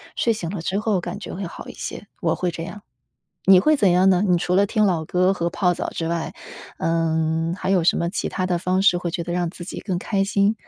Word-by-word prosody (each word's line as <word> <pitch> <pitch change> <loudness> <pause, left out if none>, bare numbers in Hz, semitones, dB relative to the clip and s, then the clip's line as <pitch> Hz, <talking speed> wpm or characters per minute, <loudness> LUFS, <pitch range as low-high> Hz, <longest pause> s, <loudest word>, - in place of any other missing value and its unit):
睡 230 - +2
醒 180 -6 -5
了 185 -2 -4
之 190 +4 -1
后 215 -3 +1
感 200 +3 -5
觉 - - -7
会 195 - -5
好 170 - -9
一 - - -8
些， - - -7
我 - - +1
会 180 - -1
这 165 - -6
样。 190 +4 -8 0.6
你 190 -1 +8
会 305 +11 +4
怎 205 -8 +3
样 180 +2 +4
呢？ 185 -1 +4
你 180 -2 +3
除 180 +1 -1
了 200 +2 +4
听 215 +1 +1
老 170 -5 0
歌 180 +4 +2
和 170 -2 -1
泡 180 0 +1
澡 - - -4
之 165 - -4
外， 170 -1 -2 0.5
嗯， 165 0 0
还 190 - -2
有 190 -3 +3
什 165 - +3
么 170 - 0
其 180 - -2
他 185 - -2
的 180 -1 0
方 185 +2 0
式， 195 -3 +5
会 175 -1 -3
觉 170 +1 -3
得 175 - -4
让 175 -1 -1
自 175 - -9
己 180 - -6
更 185 -4 -2
开 195 +1 0
心？ 200 +1 +2
180 Hz, 280 characters per minute, -22 LUFS, 170-195 Hz, 0.6 s, 你